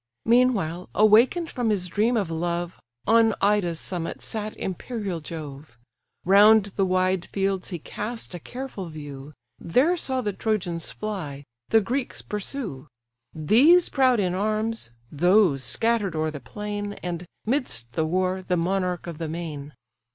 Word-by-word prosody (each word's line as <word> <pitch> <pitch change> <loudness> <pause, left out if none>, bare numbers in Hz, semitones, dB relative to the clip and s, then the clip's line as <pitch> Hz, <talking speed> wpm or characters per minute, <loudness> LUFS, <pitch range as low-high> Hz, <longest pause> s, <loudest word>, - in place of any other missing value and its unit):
Meanwhile, 220 -8 +2
awaken'd 230 +11 +4
from 245 -3 -1
his 200 -4 0
dream 220 +6 +1
of 195 -6 -1
love, 170 +1 -2 0.3
On 225 0 +4
Ida's 195 -5 +2
summit 175 -3 -4
sat 215 -1 -5
imperial 195 -1 -4
Jove: 150 -5 -8 0.5
Round 205 +3 +7
the 195 -2 +2
wide 185 -1 +1
fields 195 -1 -2
he 180 - -3
cast 215 +7 -6
a 175 - -5
careful 245 - -7
view, 145 -2 -9 0.3
There 260 - +2
saw 260 -6 -2
the 210 -4 -2
Trojans 180 -6 -2
fly, 170 -10 -5 0.3
the 225 - +5
Greeks 245 +5 -3
pursue; 205 - -5 0.5
These 265 - +5
proud 260 -4 +3
in 180 -3 +1
arms, 215 - -1 0.2
those 175 -3 +3
scatter'd 215 - 0
o'er 155 0 0
the 150 - -7
plain 205 +8 -5
And, 175 0 -4 0.2
'midst 210 - -1
the 160 -1 0
war, 185 +2 0
the 180 -1 -1
monarch 180 0 -1
of 170 -2 -7
the 165 -2 -3
main. 155 -3 -6
190 Hz, 145 wpm, -25 LUFS, 165-220 Hz, 0.5 s, Round